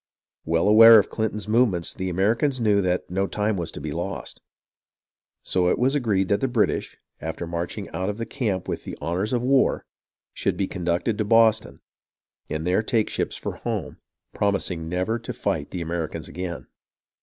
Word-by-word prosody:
Well 80 Hz, +3 st, +1 dB
aware 115 Hz, +2 st, +9 dB
of 105 Hz, -, +2 dB
Clinton's 110 Hz, -1 st, -2 dB
movements, 110 Hz, -7 st, +2 dB
the 95 Hz, -1 st, -3 dB
Americans 115 Hz, -, +1 dB
knew 105 Hz, -3 st, +3 dB
that 90 Hz, -1 st, -1 dB
no 95 Hz, +2 st, 0 dB
time 105 Hz, +1 st, -1 dB
was 85 Hz, -3 st, -3 dB
to -, -, -7 dB
be 75 Hz, +1 st, -5 dB
lost, 85 Hz, +5 st, -5 dB, 1.0 s
so 90 Hz, -1 st, +1 dB
it -, -, +2 dB
was 130 Hz, +3 st, +2 dB
agreed 105 Hz, -9 st, +1 dB
that 100 Hz, -, +2 dB
the 135 Hz, -, +2 dB
British, 120 Hz, -4 st, 0 dB, 0.2 s
after 80 Hz, +2 st, -5 dB
marching 85 Hz, +1 st, -4 dB
out 95 Hz, +2 st, -3 dB
of 105 Hz, -, -4 dB
the 115 Hz, -, -3 dB
camp 100 Hz, -9 st, -2 dB
with -, -, -4 dB
the -, -, -7 dB
honours 85 Hz, +7 st, -2 dB
of 120 Hz, -1 st, 0 dB
war, 135 Hz, +1 st, +2 dB, 0.5 s
should -, -, -1 dB
be 100 Hz, -, +1 dB
conducted 90 Hz, +4 st, -1 dB
to -, -, +2 dB
Boston, 110 Hz, 0 st, +3 dB, 0.7 s
and 80 Hz, +1 st, -3 dB
there 90 Hz, +4 st, +2 dB
take 110 Hz, -1 st, 0 dB
ships -, -, -2 dB
for -, -, -5 dB
home, -, -, -4 dB, 0.4 s
promising 95 Hz, -5 st, -1 dB
never 95 Hz, +7 st, -1 dB
to 115 Hz, -, -6 dB
fight 90 Hz, -8 st, -2 dB
the 90 Hz, -, -5 dB
Americans 85 Hz, -2 st, -4 dB
again. 90 Hz, -1 st, -6 dB
100 Hz, 180 wpm, -24 LUFS, 85-110 Hz, 1.0 s, aware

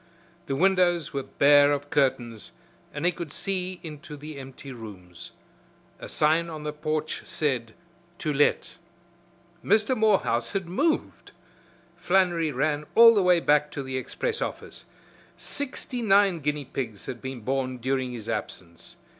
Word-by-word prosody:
The 135 Hz, -, -1 dB
windows 175 Hz, -2 st, +2 dB
were 140 Hz, -, -1 dB
bare 145 Hz, +1 st, +5 dB
of 145 Hz, 0 st, -3 dB
curtains 120 Hz, -6 st, 0 dB, 0.4 s
and -, -, -4 dB
he 180 Hz, -, +4 dB
could 170 Hz, -3 st, -7 dB
see 185 Hz, +1 st, -2 dB
into 150 Hz, -2 st, -9 dB
the 150 Hz, 0 st, -9 dB
empty 135 Hz, +1 st, -10 dB
rooms. 95 Hz, -8 st, -10 dB, 0.7 s
A -, -, -8 dB
sign 160 Hz, +2 st, +2 dB
on 155 Hz, -2 st, -7 dB
the 150 Hz, 0 st, -4 dB
porch 155 Hz, 0 st, -3 dB
said, 125 Hz, -7 st, -2 dB, 0.4 s
"To 155 Hz, -3 st, -2 dB
Let." 145 Hz, +1 st, +1 dB, 0.9 s
Mr. 215 Hz, +5 st, +3 dB
Morehouse 190 Hz, -, +2 dB
had 195 Hz, -2 st, -1 dB
moved! 300 Hz, -, -1 dB, 0.6 s
Flannery 175 Hz, -4 st, +2 dB
ran 145 Hz, +2 st, -1 dB
all 230 Hz, 0 st, +9 dB
the 205 Hz, -, +3 dB
way 180 Hz, -2 st, +4 dB
back 150 Hz, -2 st, +2 dB
to 140 Hz, -, -4 dB
the 130 Hz, 0 st, -5 dB
express 465 Hz, -, -3 dB
office. -, -, -5 dB, 0.5 s
Sixty 260 Hz, -3 st, -3 dB
nine 200 Hz, -4 st, +4 dB
guinea 150 Hz, -1 st, -2 dB
pigs 115 Hz, -7 st, -5 dB
had 120 Hz, -, -6 dB
been 130 Hz, -2 st, -6 dB
born 130 Hz, +2 st, -2 dB
during 130 Hz, +1 st, -1 dB
his 115 Hz, -3 st, -7 dB
absence. 90 Hz, -6 st, -6 dB
150 Hz, 145 wpm, -26 LUFS, 130-180 Hz, 0.9 s, all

